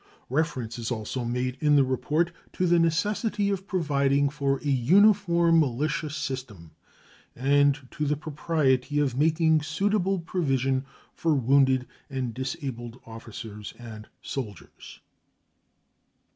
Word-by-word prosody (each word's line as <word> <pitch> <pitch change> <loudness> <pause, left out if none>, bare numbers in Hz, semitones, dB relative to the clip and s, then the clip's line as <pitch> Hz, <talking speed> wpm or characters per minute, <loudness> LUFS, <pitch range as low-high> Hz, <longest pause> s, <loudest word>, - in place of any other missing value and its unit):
Reference 130 -6 -1
is 115 - -3
also 120 +1 -3
made 125 +2 -2
in 150 -1 +4
the 140 - +6
report 150 +6 0 0.2
to 185 - 0
the 175 -1 +4
necessity 200 +5 +1
of 195 0 -3
providing 140 -6 +1
for 140 -1 0
a - - -3
uniform 170 - +4
militia 150 +3 0
system 130 - -6 0.6
and 140 +1 +2
to 150 - -2
the 150 0 0
propriety 145 -3 0
of 140 -4 +1
making 160 +2 +3
suitable 195 +5 0
provision 135 -6 -1 0.3
for 160 -2 +1
wounded 130 0 +3 0.2
and 130 -4 -3
disabled 125 -2 -5
officers 115 -2 -9
and 110 -2 -10 0.2
soldiers. 110 -9 -8
140 Hz, 115 wpm, -26 LUFS, 130-160 Hz, 0.6 s, the